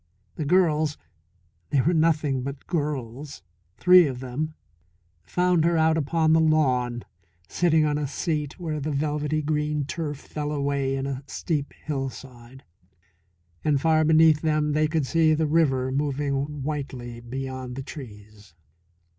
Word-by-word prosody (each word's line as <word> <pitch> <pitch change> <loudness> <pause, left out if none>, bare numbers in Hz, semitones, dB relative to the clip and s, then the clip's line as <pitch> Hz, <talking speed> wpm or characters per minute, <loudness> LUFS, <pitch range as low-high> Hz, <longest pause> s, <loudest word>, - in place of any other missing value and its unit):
The 155 - -3
girls 155 -3 +2 0.7
they 140 - +2
were 170 +7 +2
nothing 155 -5 +2
but 140 +2 -6
girls, 145 - -4 0.3
three 180 -2 +7
of 130 -3 -5
them 140 +5 -4 0.7
found 180 - +1
her 170 0 +2
out 160 0 +3
upon 160 +1 +2
the 160 - +5
lawn, 130 -7 +2 0.4
sitting 160 - +2
on 150 0 0
a 145 - -2
seat 150 +1 -3
where 155 -3 -3
the 145 +2 -3
velvety 150 +1 -1
green 150 -1 -1
turf 150 -1 -4
fell 150 +1 -5
away 140 -2 -1
in 135 0 -3
a 135 -1 -4
steep 150 -3 -3
hillside, 130 -3 -6 1.0
and 150 -2 +2
far 155 +1 +3
beneath 155 -1 +5
them 155 -1 +1
they 155 +1 +2
could 155 -2 0
see 160 +1 +3
the 160 +1 +1
river 140 -5 +2
moving 140 0 -2
whitely 130 -5 -5
beyond 130 +1 -6
the 135 - -5
trees. 105 - -11
150 Hz, 140 wpm, -25 LUFS, 135-155 Hz, 1.0 s, three